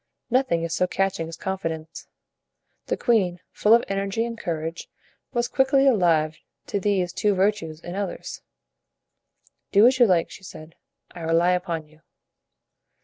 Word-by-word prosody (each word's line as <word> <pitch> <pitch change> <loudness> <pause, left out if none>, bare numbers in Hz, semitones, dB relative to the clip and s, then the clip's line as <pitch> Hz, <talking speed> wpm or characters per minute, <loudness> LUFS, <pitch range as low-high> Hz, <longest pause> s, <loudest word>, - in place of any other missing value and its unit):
Nothing 250 -10 +2
is 165 -1 -3
so 180 - +1
catching 195 -3 -1
as 165 -1 -8
confidence. 165 -4 -5 0.8
The - - -1
queen, 190 -8 +1
full 215 +2 +5
of 235 - +2
energy 195 +3 -1
and 235 0 -5
courage, 165 -4 -4 0.4
was 240 -2 0
quickly 270 +1 +3
alive 165 - +3 0.3
to 200 - -2
these 185 -3 0
two 210 -2 +1
virtues 190 -5 0
in 175 - -7
others. 200 +1 -5 1.3
"Do 205 +2 +6
as 260 +1 +4
you 240 - +7
like," 175 -4 +2
she 195 - -12
said, 160 -3 -11 0.4
"I 175 - -11
rely 165 +2 +3
upon 175 -3 -2
you." 155 +1 -23
185 Hz, 145 wpm, -24 LUFS, 165-210 Hz, 1.3 s, you